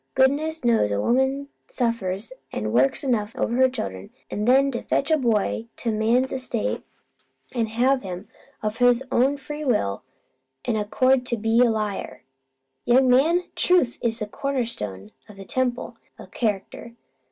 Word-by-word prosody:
Goodness 285 +3 +2
knows 225 - +3
a 100 - 0
woman 265 - +1 0.2
suffers 230 -3 -2 0.2
an' 110 0 -3
works 130 - +2
enough 230 -5 -1
over - - -1
her 260 0 +5
children, 95 - -5 0.2
an' 210 - -2
then 270 +3 +4
to 240 - -3
fetch 280 - 0
a 315 - +5
boy 225 -2 0
to 235 - -2
man's 230 +5 +2
estate 255 -4 -2 0.7
an' 235 -3 0
have 255 +4 +2
him, 185 0 -7 0.4
of 215 +1 -2
his 245 +1 +4
own 270 +4 +3
free 295 +2 -7
will 155 - 0 0.6
an' 235 - 0
accord, 250 +4 +2
be 225 +1 +3
a 245 -1 +6
liar! 210 - -3 0.6
Young 255 +2 +4
man, 325 +8 +4
truth 355 -10 +2
is 230 -1 0
the 215 - -3
cornerstone 210 - -4 0.2
o' 210 - -12
the 195 0 -10
temple 250 +1 -2 0.2
o' - - -10
character. 220 +1 -3
235 Hz, 150 wpm, -24 LUFS, 210-265 Hz, 0.7 s, a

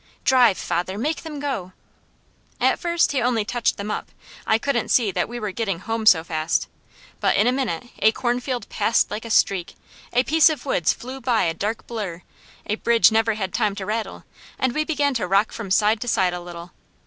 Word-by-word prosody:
"Drive 250 -7 +5
father! 180 +3 -2
Make 300 +8 -2
them 300 -3 -7
go!" 230 -11 -4 0.9
At - - +2
first 340 -1 +1
he 275 - 0
only 235 -3 +1
touched 240 +1 0
them 205 +1 -4
up; - - -4 0.4
I 220 - +4
couldn't 280 +5 -1
see 225 -5 +3
that 180 +2 -1
we 240 0 -5
were 210 -3 -3
getting 195 -3 -2
home 225 +4 -3
so 165 -6 +7
fast; 160 -1 -1 0.5
but - - +2
in - - +4
a 245 - +4
minute 250 -11 -2 0.2
a 220 - +5
cornfield 245 +1 -2
passed 220 +2 +1
like 215 +2 -5
a - - -6
streak, 195 -5 +1 0.4
a 245 +1 +3
piece 320 +4 +5
of 295 -5 -4
woods 180 - +2
flew 260 +2 -8
by 240 -2 +2
a 165 - 0
dark 210 +7 -3
blur, 195 -7 -5 0.4
a 210 - -2
bridge 230 -4 +4
never 225 0 +2
had 190 -3 -4
time 210 -4 0
to 195 - -5
rattle, 220 +2 -4 0.3
and 260 -2 0
we 305 +3 0
began 290 -3 0
to 225 -7 -2
rock 195 +3 +2
from 220 -4 -7
side 210 +3 +3
to 245 - -4
side 185 -5 +2
a 180 - -4
little. 175 0 -9
225 Hz, 205 wpm, -23 LUFS, 195-250 Hz, 0.9 s, so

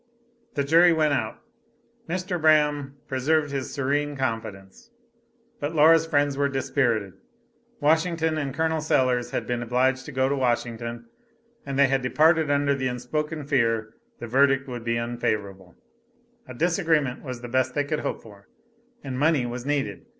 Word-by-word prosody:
The 140 - +1
jury 165 +5 +5
went 155 -2 +2
out. 110 -5 -2 0.7
Mr. 180 0 -3
Braham 150 -3 +2
preserved 145 +3 0
his 135 -2 -4
serene 145 +1 -1
confidence, 115 - -5 0.7
but 145 +3 -3
Laura's 160 +1 +5
friends 145 -2 +1
were 140 0 +1
dispirited. 120 -7 0 0.7
Washington 160 +1 +1
and 145 -3 -2
Col. 160 +2 -1
Sellers 130 -5 +1
had - - -3
been 120 -1 -2
obliged 130 +2 0
to - - -6
go 130 -1 +1
to 140 - 0
Washington, 120 -2 -2 0.6
and 135 -1 -3
they 140 - +6
had 135 0 +1
departed 155 +4 +3
under 140 0 +2
the 130 -2 -2
unspoken 150 +5 -3
fear 115 -6 0 0.2
the - - -7
verdict 135 +3 +2
would 120 -3 -6
be 115 0 -1
unfavorable, 105 -6 -3 0.7
a 130 - -9
disagreement 160 -4 +1
was 130 -4 -6
the 120 - -7
best 130 +1 0
they 145 - +1
could 150 +1 -2
hope - - -4
for, 100 -3 -16 0.6
and 130 -2 -5
money 150 -3 +2
was 120 +2 -6
needed. 145 +9 -2
135 Hz, 155 wpm, -25 LUFS, 120-150 Hz, 0.7 s, they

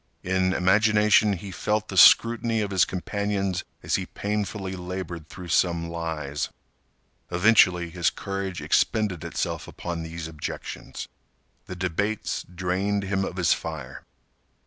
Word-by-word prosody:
In 95 0 +1
imagination 105 +2 +4
he 95 +1 -6
felt 105 +3 -1
the 95 - -5
scrutiny 115 +4 +6
of 100 -1 -2
his 95 -3 +4
companions 100 0 -2 0.2
as - - +1
he - - -4
painfully 100 -2 -3
labored 90 -3 -6
through 90 -2 -9
some 85 0 +1
lies. 80 -4 -3 0.8
Eventually, 90 -2 +4
his 85 0 +1
courage 95 -2 -4
expended 105 -7 +1
itself - - -3
upon 85 -1 -5
these 80 0 -6
objections. 75 -2 -6 0.6
The 90 - -6
debates 95 +4 -1
drained 95 +3 -1
him 95 0 0
of 95 - -5
his 85 -3 +4
fire. 75 -5 -6
95 Hz, 125 wpm, -25 LUFS, 85-100 Hz, 0.8 s, scrutiny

